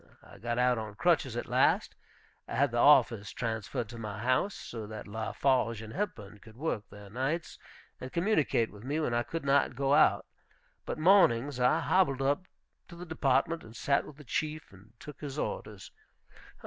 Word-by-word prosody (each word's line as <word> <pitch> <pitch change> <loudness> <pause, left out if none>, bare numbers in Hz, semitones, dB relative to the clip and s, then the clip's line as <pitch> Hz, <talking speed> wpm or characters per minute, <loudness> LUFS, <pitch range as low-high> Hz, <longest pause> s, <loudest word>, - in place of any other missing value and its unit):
I - - -15
got 120 +1 -3
out 125 -1 +3
on 105 -2 -7
crutches 135 -4 +1
at - - -3
last; - - +2 0.5
I - - -5
had 135 +1 +2
the 120 - -1
office 120 -7 +5
transferred 115 +1 -3
to 120 0 -9
my 105 -2 -5
house, 130 - +1
so 110 -3 -7
that 110 0 -8
Lafarge 115 +2 0
and 110 - -9
Hepburn 115 - -5
could 110 +2 -16
work 135 -8 -2
there 105 0 -12
nights, 150 +8 -3 0.4
and 130 - -7
communicate 170 - +1
with 105 0 -13
me 145 +5 -2
when 150 -6 -1
I 120 - +2
could 165 +4 -5
not 140 -2 +2
go 135 +1 +1
out; - - +4 0.6
but - - -3
mornings 145 -7 +4
I 125 0 +3
hobbled 140 -8 +2
up 145 +7 0 0.4
to 170 - -12
the 175 +1 -8
Department, 160 0 0
and 110 +1 -13
sat 140 +4 +1
with 145 - -12
the 150 - -12
Chief, 155 +4 -3
and 100 +4 -18
took 150 - -11
his 145 -1 -6
orders. - - -5
130 Hz, 185 wpm, -30 LUFS, 115-150 Hz, 0.6 s, office